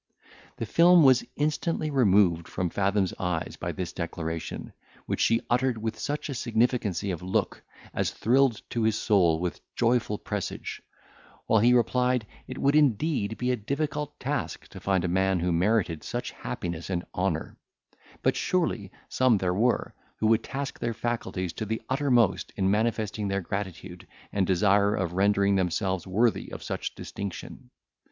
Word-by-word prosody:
The 115 - -3
film 170 +7 +6
was 130 -3 +6
instantly 155 +1 -1
removed 95 - +3
from 90 -2 -2
Fathom's 100 -1 +1
eyes 90 -3 -2
by - - -4
this 90 -2 -5
declaration, 80 -1 -5 0.3
which - - -2
she 115 0 +3
uttered 125 0 +1
with 110 0 -4
such 150 +1 -3
a 140 - -4
significancy 115 -5 0
of 85 - -4
look, 95 +1 -1 0.3
as - - 0
thrilled 125 0 +2
to 120 - -1
his 110 -1 +2
soul 85 -6 +3
with 90 0 -3
joyful 115 -3 +1
presage, 105 -2 -5 0.6
while 110 - +4
he 120 +4 +5
replied, 125 0 +2 0.2
it 130 - -7
would, 140 +2 +2
indeed, 130 -5 +2
be 125 +3 0
a - - +2
difficult 145 +5 -3
task 140 +1 -3
to 95 - -10
find 95 -1 +1
a - - +1
man 95 +1 +2
who 90 +1 0
merited 90 -2 +1
such - - -4
happiness 85 0 -5
and 90 -2 -2
honour; - - -1 0.7
but, - - +3
surely, 120 - -1 0.2
some 130 -4 +3
there 90 -2 0
were, 120 +6 +1 0.2
who - - -2
would 110 +1 +4
task 140 0 -5
their 115 -1 -2
faculties 110 -7 -3
to - - -4
the 110 +1 -1
uttermost, 130 -7 +2
in 95 -1 +1
manifesting 110 -1 0
their 100 0 -1
gratitude, 95 -1 -6 0.3
and 95 -2 +1
desire 100 +2 +3
of 90 -2 -2
rendering 100 +1 +3
themselves 95 0 -1
worthy 110 +5 +1
of - - -7
such - - -4
distinction. 100 -9 -7
105 Hz, 160 wpm, -27 LUFS, 95-125 Hz, 0.7 s, film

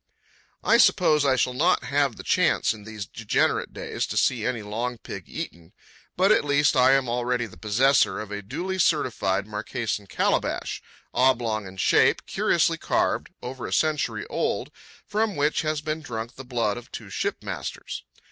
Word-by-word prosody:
I 230 - +5
suppose 155 -10 +4
I 135 -2 +4
shall 125 0 +1
not 165 +8 +2
have 140 -4 +1
the - - -9
chance - - +2
in 105 -2 -12
these 110 -2 -6
degenerate 110 0 0
days - - -4
to - - -4
see 120 -4 +2
any 120 -4 -2
long 120 +4 -3
pig 100 -5 -8
eaten, 85 0 -7 0.4
but 190 +3 +4
at 215 - +4
least 145 0 +3
I 130 +1 +6
am 135 -2 +2
already 120 0 0
the 100 - -12
possessor 105 - +3
of 110 -1 -7
a 105 0 -4
duly 185 - -4
certified 105 - +1
Marquesan 105 0 -3
calabash, - - -1 0.3
oblong 115 -5 +2
in 95 0 -11
shape, - - +3
curiously - - +1
carved, - - 0
over 125 0 -5
a - - -7
century 155 -2 0
old, - - -2 0.3
from 215 -1 0
which 145 +1 +1
has 155 -1 -1
been 155 +1 -3
drunk 115 -4 -5
the 135 - -9
blood 115 -4 -1
of 120 - -11
two - - -8
shipmasters. - - -4
125 Hz, 165 wpm, -25 LUFS, 110-145 Hz, 0.4 s, I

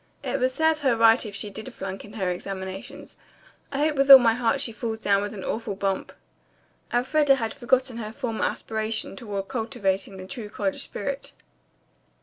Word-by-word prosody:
"It - - -1
would 255 - +3
serve 320 +3 +1
her 265 -5 +2
right 225 +1 +6
if 200 - -8
she 205 0 -2
did 220 +6 -7
flunk 195 -4 -6
in 210 - -12
her 190 -5 -1
examinations. 195 +10 -7 0.5
I 275 - -3
hope 300 0 +1
with 275 0 +2
all 270 - +14
my 235 -3 +3
heart 240 +2 +1
she 250 - 0
falls 225 0 -4
down 200 -2 +2
with 205 0 -3
an 200 -3 -7
awful 220 -3 -3
bump." 195 -1 -2 0.8
Elfreda 275 +3 +3
had 225 -4 -3
forgotten 255 -2 +1
her 215 -2 -5
former 230 -2 -2
aspirations 220 -2 -3
toward 200 -4 -4
cultivating 200 -5 -2
the 185 - -8
true 215 0 -7
college 200 -2 -2
spirit. 270 +7 -5
225 Hz, 180 wpm, -25 LUFS, 200-260 Hz, 0.8 s, all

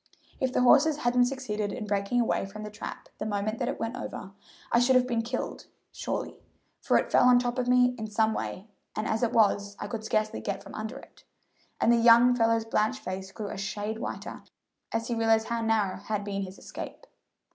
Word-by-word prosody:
If 260 -1 0
the 250 - +2
horses 295 +4 +5
hadn't 245 -2 +3
succeeded 215 -6 -3
in 220 -1 -5
breaking 200 +3 0
away 225 -4 +1
from 215 +2 -8
the 210 - -7
trap 210 - -8
the - - -3
moment 215 +1 -2
that - - -1
it - - -3
went 225 +2 -3
over, 220 -5 -6 0.4
I 235 - +5
should 250 +2 +4
have 255 0 +5
been 235 -2 0
killed 240 +2 -4 0.2
surely, - - -4 0.4
for - - +3
it - - -1
fell - - +5
on 250 - +7
top 245 +1 0
of 250 - -1
me 250 0 +4
in 220 - -3
some 220 +1 +2
way, 195 0 -5 0.3
and 215 - -2
as 220 - 0
it 240 -1 +1
was, 205 -3 +2
I - - -4
could 220 +1 -5
scarcely 215 0 -1
get 200 -1 -4
from - - -11
under 220 +4 -5
it;" - - -16 0.6
and 235 - +4
the - - +4
young 235 +1 +7
fellow's 230 -1 +2
blanched 225 +3 0
face 190 +1 -5
grew 205 +1 -6
a 210 - -6
shade 205 +3 -3
whiter - - -6 0.5
as 225 0 -2
he 240 - -1
realized 225 0 +2
how 235 0 -1
narrow 220 -4 +1
had 205 +1 -3
been 200 -1 -3
his 190 0 -7
escape. - - -8
225 Hz, 215 wpm, -28 LUFS, 210-245 Hz, 0.6 s, on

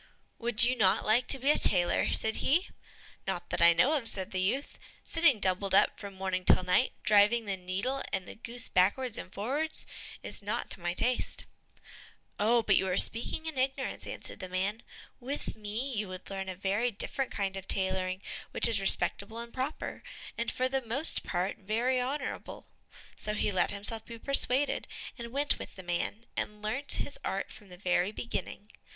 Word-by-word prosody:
"Would 235 -1 +3
you 250 +2 +4
not 195 -6 +2
like 230 +4 +3
to 270 - +9
be 270 +3 +3
a - - +3
tailor?" 175 -2 +4
said 220 0 +5
he. 340 +8 +1 0.6
"Not - - -4
that - - -1
I 170 - +8
know 250 - +3
of," 260 -7 +1
said 190 -4 -1
the 185 - -1
youth; 255 +10 -2 0.2
"sitting 325 -9 +3
doubled 190 0 0
up - - +3
from 200 -2 -8
morning 190 -1 -2
till 185 - +4
night, 180 +8 +2
driving 210 +3 +4
the 200 -1 -1
needle 195 +9 -3
and 190 -2 -2
the - - -8
goose 235 +1 -2
backwards 225 +6 +1
and 185 - -8
forwards, 285 +11 -1 0.4
is - - -7
not 215 +4 -4
to - - -2
my 175 0 -2
taste." 250 +5 0 0.9
"Oh, 230 +3 +3
but 195 - +4
you 190 - +1
are 180 - 0
speaking 235 +7 +4
in 315 -5 -4
ignorance," 265 +1 -2
answered - - -6
the 185 -3 -7
man; 195 +5 -1 0.4
"with 270 +4 -5
me 220 +6 -4
you 210 -3 -2
would 185 +1 -8
learn 190 -1 -4
a 185 - -5
very 200 +6 0
different 255 +4 -3
kind 195 -1 -2
of 190 -1 -7
tailoring, 190 0 -1 0.3
which - - +2
is 220 -4 +4
respectable 200 +2 +2
and 235 0 -7
proper, 265 +4 -4 0.3
and - - -2
for 255 - 0
the 265 0 -1
most 260 +6 +2
part 180 +1 -2
very 230 +6 0
honorable." 265 +4 -4 0.5
So 210 - -2
he 205 - 0
let 185 - +1
himself 210 +2 -4
be 230 - -9
persuaded, 275 +2 +3 0.3
and 235 - -5
went 285 +3 +2
with - - -9
the 190 - -10
man, 175 +6 -3
and 210 0 -3
learnt 255 +7 0
his 285 - -1
art 195 - -3
from 205 -3 -15
the 180 - -12
very 180 +1 +1
beginning. 215 -1 -6
215 Hz, 190 wpm, -30 LUFS, 190-255 Hz, 0.9 s, to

